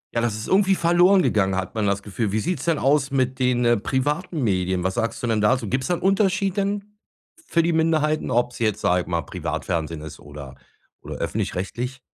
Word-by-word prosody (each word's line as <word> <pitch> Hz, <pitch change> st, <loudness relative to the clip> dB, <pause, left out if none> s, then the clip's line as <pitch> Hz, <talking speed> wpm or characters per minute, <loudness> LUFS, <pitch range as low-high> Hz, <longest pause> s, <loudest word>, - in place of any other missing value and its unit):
Ja, 115 Hz, -, +2 dB
das 115 Hz, -3 st, 0 dB
ist 110 Hz, -, -6 dB
irgendwie 195 Hz, 0 st, +3 dB
verloren 175 Hz, +2 st, +4 dB
gegangen, 95 Hz, -3 st, +1 dB
hat 95 Hz, -1 st, -3 dB
man 110 Hz, -2 st, 0 dB
das 100 Hz, 0 st, -1 dB
Gefühl. 105 Hz, 0 st, -3 dB
Wie 110 Hz, -, 0 dB
sieht's 175 Hz, +10 st, -2 dB
denn 165 Hz, -2 st, +2 dB
aus 140 Hz, 0 st, +2 dB
mit 130 Hz, -1 st, 0 dB
den, 125 Hz, -1 st, +2 dB
äh, 120 Hz, 0 st, +4 dB
privaten 145 Hz, -, -2 dB
Medien? 95 Hz, -3 st, 0 dB
Was 95 Hz, +1 st, 0 dB
sagst 115 Hz, +1 st, -2 dB
du -, -, 0 dB
denn 110 Hz, -2 st, +1 dB
da 105 Hz, +5 st, +4 dB
so? 115 Hz, -, -6 dB
Gibt 130 Hz, +5 st, -1 dB
es -, -, -3 dB
da 180 Hz, -, +1 dB
'n -, -, -8 dB
Unterschied 195 Hz, 0 st, +1 dB
denn 200 Hz, 0 st, -1 dB, 0.5 s
f 330 Hz, -, -24 dB
für 170 Hz, -, +2 dB
die 170 Hz, +1 st, +1 dB
Minderheiten, 155 Hz, -1 st, +1 dB
ob's 120 Hz, +1 st, 0 dB
jetzt, 110 Hz, -3 st, 0 dB
sage 90 Hz, 0 st, +2 dB
ich -, -, -10 dB
mal, 85 Hz, -2 st, -1 dB
Privatfernsehen 80 Hz, +1 st, -4 dB
ist 80 Hz, 0 st, -9 dB
oder 70 Hz, -2 st, -10 dB, 0.5 s
oder -, -, -7 dB
öffentlich -, -, -3 dB
rechtlich? 125 Hz, +8 st, -4 dB
125 Hz, 225 wpm, -23 LUFS, 100-165 Hz, 0.5 s, verloren